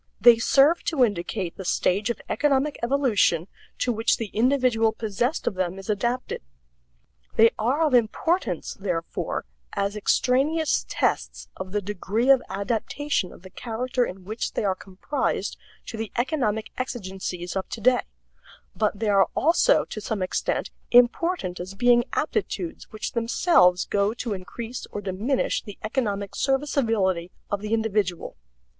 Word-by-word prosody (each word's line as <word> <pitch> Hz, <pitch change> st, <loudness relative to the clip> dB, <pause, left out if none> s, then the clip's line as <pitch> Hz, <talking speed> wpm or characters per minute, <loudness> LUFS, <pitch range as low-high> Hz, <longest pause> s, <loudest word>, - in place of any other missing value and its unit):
They 230 Hz, +2 st, +7 dB
serve 285 Hz, +8 st, +4 dB
to 280 Hz, -7 st, +4 dB
indicate 185 Hz, -3 st, -3 dB
the 190 Hz, -, -6 dB
stage 195 Hz, +4 st, +1 dB
of 235 Hz, -, -2 dB
economic 290 Hz, 0 st, +1 dB
evolution 235 Hz, -, +2 dB, 0.3 s
to 250 Hz, -, +1 dB
which 225 Hz, +1 st, +2 dB
the 225 Hz, -3 st, -4 dB
individual 245 Hz, -2 st, +3 dB
possessed 225 Hz, +6 st, -2 dB
of -, -, 0 dB
them 185 Hz, 0 st, -2 dB
is 195 Hz, +2 st, -3 dB
adapted. 240 Hz, -, -2 dB, 0.9 s
They 225 Hz, +1 st, +6 dB
are 260 Hz, +9 st, +2 dB
of 305 Hz, -4 st, +2 dB
importance, 235 Hz, -, +1 dB
therefore, 175 Hz, -4 st, -3 dB, 0.3 s
as 200 Hz, 0 st, -1 dB
extraneous 275 Hz, +9 st, +1 dB
tests -, -, -1 dB
of 190 Hz, 0 st, -7 dB
the 205 Hz, 0 st, -1 dB
degree 210 Hz, +6 st, +1 dB
of 265 Hz, -2 st, +6 dB
adaptation 220 Hz, +2 st, -1 dB
of -, -, -15 dB
the 185 Hz, -, -12 dB
character 245 Hz, +3 st, -2 dB
in 190 Hz, -4 st, -6 dB
which 220 Hz, +4 st, -3 dB
they -, -, -1 dB
are 195 Hz, -, +2 dB
comprised 190 Hz, +9 st, -3 dB, 0.3 s
to 225 Hz, -, -7 dB
the 220 Hz, -1 st, -4 dB
economic 235 Hz, -5 st, 0 dB
exigencies 190 Hz, -7 st, -4 dB
of 190 Hz, -, -3 dB
today, 245 Hz, +3 st, +2 dB, 0.7 s
but 210 Hz, -2 st, 0 dB
they 220 Hz, 0 st, -1 dB
are 195 Hz, -1 st, +5 dB
also 345 Hz, -, +4 dB
to 215 Hz, -, -7 dB
some 205 Hz, -2 st, -2 dB
extent 185 Hz, -, -1 dB, 0.2 s
important 245 Hz, -, +3 dB
as 185 Hz, +2 st, -6 dB
being 240 Hz, +2 st, +4 dB
aptitudes 345 Hz, 0 st, -2 dB
which 215 Hz, -3 st, -4 dB
themselves 230 Hz, -, +3 dB
go 205 Hz, +2 st, +1 dB
to 235 Hz, -3 st, -3 dB
increase 225 Hz, +6 st, -6 dB
or -, -, -6 dB
diminish 205 Hz, +7 st, -1 dB
the 205 Hz, -3 st, -10 dB
economic 210 Hz, -4 st, -2 dB
serviceability 225 Hz, -11 st, +1 dB, 0.2 s
of 200 Hz, -1 st, -1 dB
the 210 Hz, 0 st, -5 dB
individual. 210 Hz, -5 st, 0 dB
220 Hz, 145 wpm, -25 LUFS, 195-255 Hz, 0.9 s, They